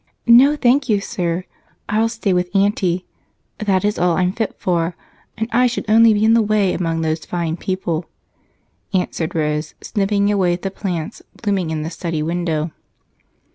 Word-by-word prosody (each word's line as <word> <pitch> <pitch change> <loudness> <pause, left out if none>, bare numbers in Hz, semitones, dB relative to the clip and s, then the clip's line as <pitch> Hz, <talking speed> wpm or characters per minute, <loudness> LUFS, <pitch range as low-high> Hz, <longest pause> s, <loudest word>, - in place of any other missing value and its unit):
"No, 255 +5 +7
thank 260 -1 +2
you, 210 -2 +3
sir 175 -2 -2 0.4
I'll 220 +2 +1
stay 225 -4 -1
with 180 0 0
Aunty; 190 -3 +1 0.5
that 200 -2 +1
is 210 - 0
all 175 -1 +2
I'm 180 -1 +2
fit 220 +2 -3
for 170 -1 -1 0.4
and 220 - -2
I 250 +2 +4
should 245 0 -3
only 225 +1 +6
be 210 0 +2
in 225 - +5
the 230 - +5
way 210 -3 +2
among 165 -2 -1
those 160 0 -1
fine 170 -2 -2
people," 175 -3 -3 0.9
answered 170 -3 -1
Rose, 150 -1 -1
snipping 200 -1 0
away 185 -4 +2
at 175 - -5
the 195 - -2
plants 185 -1 -4 0.2
blooming 195 -6 0
in 155 -1 -2
the 160 - -5
study 165 -2 -3
window. 165 -1 -1
185 Hz, 170 wpm, -19 LUFS, 170-215 Hz, 0.9 s, No